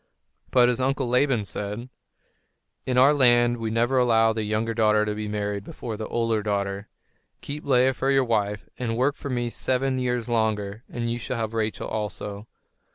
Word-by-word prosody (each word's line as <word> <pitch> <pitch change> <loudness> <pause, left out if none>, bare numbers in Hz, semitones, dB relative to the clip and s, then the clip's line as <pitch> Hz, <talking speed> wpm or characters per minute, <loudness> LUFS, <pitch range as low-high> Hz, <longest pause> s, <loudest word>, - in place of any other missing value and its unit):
But 125 -1 +5
his 125 +1 0
uncle 135 0 0
Laban 125 -3 +2
said: 105 +5 -5 1.0
"In 125 -1 0
our 135 +3 +6
land 120 -3 +4
we 115 -1 -3
never 120 +4 +2
allow 115 -2 +4
the 110 - -2
younger 110 +2 -1
daughter 105 -1 +3
to 105 - -1
be 105 0 -4
married 105 -1 -3
before 110 +2 -6
the 110 0 -5
older 115 -2 0
daughter. 100 -1 -2 0.5
Keep 145 +2 -7
Leah 130 -1 +4
for 135 +2 -1
your 135 -1 +3
wife, 105 -3 -1
and 115 -2 -2
work 135 +3 +2
for 140 - -7
me 120 -2 -1
seven 130 +1 0
years 125 -2 -1
longer, 110 -2 -1
and 115 -1 -3
you 120 - -3
shall 125 - -4
have 110 -1 -3
Rachel 110 -1 -2
also." 105 -1 -5
115 Hz, 180 wpm, -25 LUFS, 105-125 Hz, 1.0 s, our